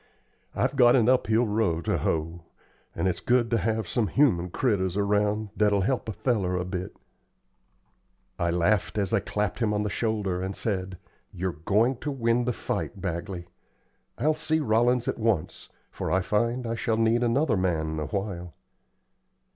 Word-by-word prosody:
"I've - - 0
got 125 -2 +6
an 120 -4 +3
uphill 125 -2 +3
row 105 -6 0
to - - -1
hoe, 80 +2 -2 0.5
and - - 0
it's 90 - -1
good 120 -1 +1
ter 115 - +3
have 110 0 -1
some 115 +2 0
human 90 - +2
critters 95 -4 0
around 105 +1 +1
that'll 105 -2 +3
help 120 +3 -1
a - - -3
feller 105 -4 0
a 90 - -2
bit." 90 0 -5 1.4
I 85 - +1
laughed 90 +5 +1
as 100 -3 0
I - - +4
clapped 105 0 -2
him 105 -3 +1
on 105 - 0
the 105 - -2
shoulder, 105 -5 -1
and 95 +1 -3
said: 95 -4 -3 0.3
"You're 90 -1 -3
going 105 - +1
to 150 - -4
win 120 -3 +1
the 125 - +1
fight, 100 - -4
Bagley. 90 0 -4 0.7
I'll 150 +6 +2
see 155 +1 0
Rollins 120 -1 +2
at - - -2
once, 110 -8 -1 0.2
for - - -4
I 95 - +2
find 115 +6 0
I 115 - -2
shall 115 -1 -1
need 115 +1 +2
another 125 +1 +2
man 80 -4 -1
awhile." 90 0 -4
105 Hz, 165 wpm, -26 LUFS, 95-115 Hz, 1.4 s, got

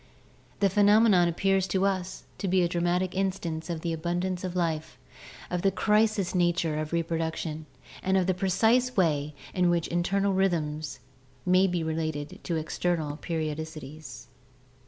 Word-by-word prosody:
The 200 - +4
phenomenon 205 -2 +5
ap 170 - -3
pears 195 -1 +2
to 190 +1 +1
us 190 -2 -2 0.2
to 195 - -2
be 185 0 +3
a - - +3
dramatic 175 +1 0
instance 185 -4 -2
of 165 -2 -3
the 170 -1 -2
abundance 175 +3 -2
of 185 -1 -4
life, 165 -3 -2 0.5
of 180 -1 -1
the 195 - +3
crisis 210 -1 +2
nature 175 -3 +1
of 155 0 -4
reproduction, 160 -2 -2 0.3
and 190 0 +2
of 185 - +2
the 185 - +2
precise 220 +7 +2
way 150 -5 +1 0.2
in 180 -1 +2
which 170 -1 +1
internal 195 +3 +1
rhythms 155 -7 -1 0.4
may 185 +1 +4
be 175 -2 -1
related 155 -2 -3
to 170 - -1
external 160 -1 -1
periodicities." 155 - -5
175 Hz, 150 wpm, -28 LUFS, 160-190 Hz, 0.5 s, phenomenon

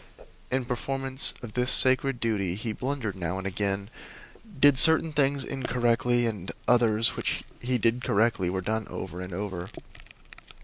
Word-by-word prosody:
In 130 -1 -1
performance 135 +2 +1
of 110 -3 -8
this 125 +1 +2
sacred 130 0 +4
duty 100 -6 -1
he 110 +2 -4
blundered 125 -5 -4
now 90 0 -4
and 95 - -6
again, 100 +2 -3 0.7
did 145 -2 +5
certain 160 +3 +4
things 140 -1 +1
incorrectly, 120 -2 0
and 105 -5 -4 0.2
others 115 -2 +3
which - - -2 0.2
he 125 +1 -1
did 115 +2 0
correctly 105 -4 +1
were 95 +1 -3
done 110 +3 -2
over 90 -1 -7
and 90 0 -7
over. 95 -1 -5
115 Hz, 145 wpm, -26 LUFS, 100-130 Hz, 0.7 s, did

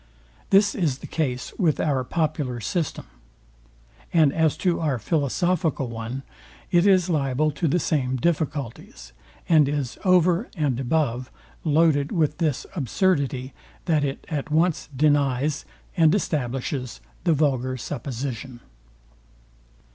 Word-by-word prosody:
This 200 +1 +5
is 155 -9 0
the - - -10
case 125 -6 -3
with 160 -8 +2
our 140 -4 +1
popular 145 -4 -2
system. 155 - -2 1.1
And 155 -5 +4
as 160 -2 +2
to 180 -3 +1
our 150 -5 0
philosophical 155 - 0
one, 115 +3 -5 0.5
it 175 +1 +4
is 185 -3 +4
liable 150 -2 +1
to 165 +3 -1
the 165 - +2
same 135 -6 0
difficulties; 145 - -3 0.3
and 155 -4 +5
is 145 -4 -3
over 180 +2 +3
and 140 -6 0
above 130 -2 0 0.3
loaded 150 -2 +3
with 155 -2 0
this 155 -6 0
absurdity, 140 - 0 0.3
that 155 -4 +2
it 135 -1 -3
at 150 -1 -3
once 160 +1 +1
denies 145 0 +1 0.3
and 165 -1 +5
establishes 135 - -2 0.2
the 170 -2 +3
vulgar 130 -4 0
supposition. 130 -1 -5
150 Hz, 120 wpm, -24 LUFS, 130-165 Hz, 1.1 s, This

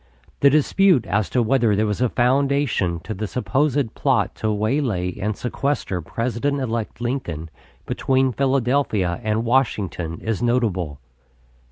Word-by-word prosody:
The 140 - +6
dispute 155 - +3
as 100 +2 0
to 125 - +2
whether 115 -3 +2
there 110 +2 +1
was 105 +2 -2
a 125 - +3
foundation 130 - +1
to 110 - -5
the 105 +2 -4
supposed 135 +1 0
plot - - +1
to 110 - -1
waylay 105 -5 0
and 105 +1 -2
sequester 125 -7 -2
President 120 - -2
elect 115 -3 -3
Lincoln 85 - -3 0.3
between 130 -1 +1
Philadelphia 130 -9 +1
and 110 +1 0
Washington 100 -9 0
is 110 -2 -2
notable. 105 - 0
115 Hz, 135 wpm, -22 LUFS, 105-135 Hz, 0.3 s, The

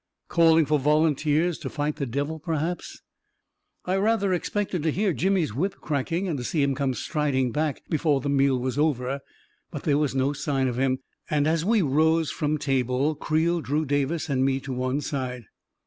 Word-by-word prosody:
Calling 165 -1 +5
for 150 +1 +2
volunteers 155 +3 +2
to - - -5
fight 150 0 -2
the 140 -3 -2
devil, 145 +6 -3
perhaps... 165 +2 -3 0.8
I 185 +1 +1
rather 200 -1 +2
expected 185 0 -1
to 160 +1 +1
hear 195 +2 +1
Jimmy's 180 - +1
whip 185 - -1
cracking 160 +6 -2
and 155 -6 -2
to - - -4
see 145 +4 0
him 140 -1 +2
come 135 -1 -1
striding 135 -4 0
back, 150 +2 -2
before 155 -3 +1
the 135 - -4
meal 140 -1 +3
was 130 +2 -2
over; 140 -3 0 0.5
but - - -7
there 145 -1 +2
was 145 -3 0
no 135 +2 +1
sign 140 -2 -1
of 125 0 -2
him, 130 -1 +2 0.3
and 145 -1 +2
as 160 +1 +1
we 215 +1 +3
rose 160 +2 +2
from 155 -2 -1
table, 135 +1 0
Creel 160 +3 0
drew 150 +2 -1
Davis 145 +3 0
and 135 -3 +1
me 135 0 +1
to 135 -1 -5
one 130 +3 -1
side. 130 -4 -4
150 Hz, 185 wpm, -25 LUFS, 135-160 Hz, 0.8 s, Calling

